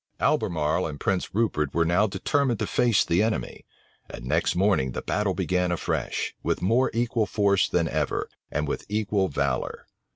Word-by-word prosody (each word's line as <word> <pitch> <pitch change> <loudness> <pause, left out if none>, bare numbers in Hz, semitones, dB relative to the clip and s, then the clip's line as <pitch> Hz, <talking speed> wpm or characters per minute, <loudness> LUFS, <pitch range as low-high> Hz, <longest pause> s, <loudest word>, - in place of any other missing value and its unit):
Albemarle 80 +2 +1
and 75 -2 -7
Prince 95 0 -1
Rupert 90 -11 0
were 85 0 +3
now 90 +6 +3
determined 135 +3 0
to - - -1
face 120 -4 +2
the 85 +3 +2
enemy; 110 0 -2 0.4
and - - -8
next 65 - +1
morning, 90 -9 +2
the - - -4
battle 105 -3 0
began 90 +1 0
afresh, 85 - -2
with - - -1
more 115 +8 +2
equal 115 -2 0
force 100 -1 +2
than - - +1
ever, - - -1 0.2
and 75 +1 -1
with - - -3
equal 105 -2 +1
valor. 70 -4 -2
95 Hz, 165 wpm, -26 LUFS, 80-110 Hz, 0.4 s, were